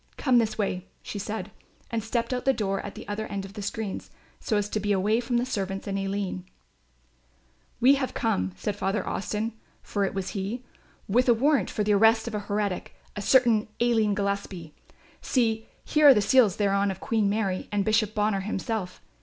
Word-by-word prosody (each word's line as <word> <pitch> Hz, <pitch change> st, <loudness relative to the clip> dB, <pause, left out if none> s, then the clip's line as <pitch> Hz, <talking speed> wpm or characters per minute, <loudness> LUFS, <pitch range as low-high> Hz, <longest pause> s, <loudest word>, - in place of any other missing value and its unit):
Come 255 Hz, -4 st, +4 dB
this 220 Hz, -2 st, 0 dB
way," 190 Hz, -3 st, -2 dB, 0.2 s
she 205 Hz, -, -5 dB
said, 210 Hz, 0 st, -4 dB, 0.4 s
and 230 Hz, -2 st, -1 dB
stepped 235 Hz, +2 st, -1 dB
out 250 Hz, -, 0 dB
of -, -, -13 dB
the 270 Hz, -, +4 dB
door 195 Hz, -4 st, -1 dB
at 200 Hz, -, -7 dB
the -, -, -9 dB
other 210 Hz, +1 st, -3 dB
end 200 Hz, -1 st, -4 dB
of 195 Hz, -, -11 dB
the 210 Hz, -, -6 dB
screens, 205 Hz, 0 st, -4 dB, 0.3 s
so 215 Hz, -, 0 dB
as 205 Hz, 0 st, 0 dB
to 215 Hz, -, -1 dB
be 205 Hz, 0 st, -1 dB
away 205 Hz, +3 st, +2 dB
from 245 Hz, 0 st, -1 dB
the 240 Hz, -, +1 dB
servants 195 Hz, -5 st, -3 dB
and 200 Hz, -2 st, -3 dB
Aline. 195 Hz, -1 st, -3 dB, 1.4 s
"We 260 Hz, +4 st, +6 dB
have 260 Hz, -, -3 dB
come," 95 Hz, -, 0 dB
said 190 Hz, -, -3 dB
Father 195 Hz, +1 st, -1 dB
Austin, 210 Hz, +3 st, -2 dB, 0.3 s
for 205 Hz, -, -1 dB
it 195 Hz, -, -1 dB
was 195 Hz, -2 st, -2 dB
he, 210 Hz, +5 st, -4 dB, 0.4 s
"with 245 Hz, +5 st, +3 dB
a 235 Hz, -, +6 dB
warrant 270 Hz, -3 st, +2 dB
for 210 Hz, -, -1 dB
the 210 Hz, 0 st, +2 dB
arrest 225 Hz, +2 st, +4 dB
of 230 Hz, -, -4 dB
a 210 Hz, -, -1 dB
heretic, 205 Hz, -2 st, -3 dB, 0.2 s
a 205 Hz, -, -4 dB
certain 235 Hz, -1 st, +4 dB
Aline 225 Hz, -4 st, +2 dB
Gillespie; 200 Hz, -5 st, -3 dB, 0.5 s
see, 225 Hz, -3 st, 0 dB, 0.2 s
here 300 Hz, -1 st, +5 dB
are 280 Hz, -, +11 dB
the -, -, +4 dB
seals 220 Hz, -2 st, +4 dB
thereon 200 Hz, -1 st, +2 dB
of 190 Hz, -1 st, -4 dB
Queen 215 Hz, -2 st, +1 dB
Mary 200 Hz, -3 st, -1 dB
and 205 Hz, -1 st, 0 dB
Bishop 215 Hz, -1 st, +2 dB
Bonner 210 Hz, -1 st, +1 dB
himself. 195 Hz, -1 st, -4 dB
210 Hz, 200 wpm, -27 LUFS, 195-225 Hz, 1.4 s, are